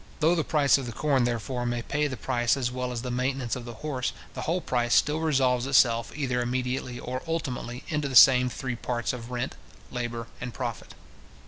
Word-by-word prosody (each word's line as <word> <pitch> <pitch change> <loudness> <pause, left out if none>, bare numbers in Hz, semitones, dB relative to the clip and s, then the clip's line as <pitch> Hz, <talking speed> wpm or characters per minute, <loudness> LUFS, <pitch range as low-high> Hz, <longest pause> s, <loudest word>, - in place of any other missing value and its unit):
Though 160 +2 +4
the 165 -3 +1
price 145 -3 +3
of 130 - -5
the - - -4
corn, 135 -1 +2
therefore, 120 +1 -2
may 120 -1 -2
pay 150 +4 0
the 130 -3 -5
price 120 +1 +1
as 125 -3 -1
well 125 0 -3
as 120 -1 -4
the 125 - -3
maintenance 125 0 -1
of 125 -2 -7
the 120 -1 -8
horse, 130 -4 -2 0.2
the - - -5
whole 170 +3 0
price 120 -7 +1
still 150 +1 +3
resolves 130 -5 +2
itself, 115 -4 +3
either 130 -4 -1
immediately 125 0 -2
or 130 +1 -4
ultimately, 130 -6 -3
into 150 -2 -1
the 135 - -4
same 125 +1 +8
three 130 0 -4
parts 120 0 -2
of 120 -1 -7
rent, 125 +1 -3 0.4
labour, 120 -2 -3 0.2
and 120 -1 -5
profit. 120 -4 -5
125 Hz, 205 wpm, -27 LUFS, 120-135 Hz, 0.4 s, same